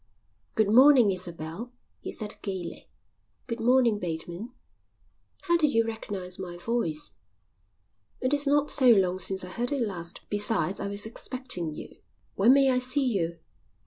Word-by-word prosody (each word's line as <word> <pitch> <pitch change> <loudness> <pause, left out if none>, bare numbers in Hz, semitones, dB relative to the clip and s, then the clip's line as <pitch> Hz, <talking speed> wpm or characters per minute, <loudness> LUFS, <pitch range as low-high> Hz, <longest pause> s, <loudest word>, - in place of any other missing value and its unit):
"Good 215 -2 +2
morning, 255 -4 +7
Isabel," 175 +4 -5 0.3
he - - -7
said 210 -2 -5
gaily. 190 -4 -6 0.6
"Good 230 -1 -5
morning, 235 -2 +3
Bateman." 175 +6 -5 0.9
"How 345 -2 +2
did 305 -4 +1
you 230 0 +3
recognise 195 -5 -6
my 175 -2 -6
voice?" 175 - -2 1.1
"It 255 +2 -1
is 290 0 +1
not 290 +1 +2
so 260 -3 +5
long 185 -5 +3
since 190 0 0
I - - -9
heard 240 +7 -3
it 285 - -1
last. 175 -5 -6
Besides, 205 -4 +1
I 200 - -3
was 200 +1 -1
expecting 225 - -3
you." - - -11 0.3
"When 215 +6 +4
may 270 0 +5
I 250 - +2
see 255 +2 +3
you?" 170 -8 -1
215 Hz, 150 wpm, -27 LUFS, 180-250 Hz, 1.1 s, morning